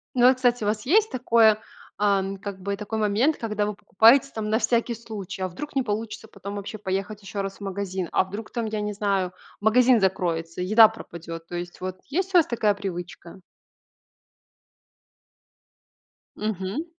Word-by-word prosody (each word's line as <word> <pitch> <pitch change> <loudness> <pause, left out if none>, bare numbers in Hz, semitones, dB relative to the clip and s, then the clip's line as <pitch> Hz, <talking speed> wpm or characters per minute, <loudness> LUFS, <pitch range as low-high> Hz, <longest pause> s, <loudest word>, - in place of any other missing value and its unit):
Ну 250 +1 +7
и, - - +6
кстати, 245 -3 +1
у - - -1
вас 215 +2 -1
есть 430 +9 +3
такое, 230 -4 +4 0.4
ам, 195 -1 +1
как 195 -1 -7
бы, 200 +1 -3
такой 220 +1 -4
момент, 215 +9 +2
когда 210 -2 -1
вы 210 -1 -3
покупаете, 230 +8 +5
там, 215 -1 -3
на 220 +2 +2
всякий 235 -1 +1
случай. 205 -4 -7
А 185 - -1
вдруг 295 +12 -8
не 265 - +2
получится 220 0 -4
потом 200 +1 -8
вообще 205 +2 -6
поехать 195 +1 -3
еще 200 +1 -4
раз 195 0 -5
в - - -21
магазин? 190 -2 -3
А - - +4
вдруг 205 +3 -7
там, 235 -2 -3
я 215 -1 -3
не 210 0 -2
знаю, 195 -3 0 0.3
магазин 240 +3 +5
закроется, 170 -3 -1
еда 215 +4 +7
пропадет? 165 -6 -9
То 175 - -7
есть 175 +1 -6
вот 185 0 -4
есть 375 +5 -1
у - - +7
вас 330 - +5
такая 215 -3 +1
привычка? 180 -2 -7 3.0
Мгм. 210 - -3
210 Hz, 175 wpm, -25 LUFS, 190-230 Hz, 3.0 s, Ну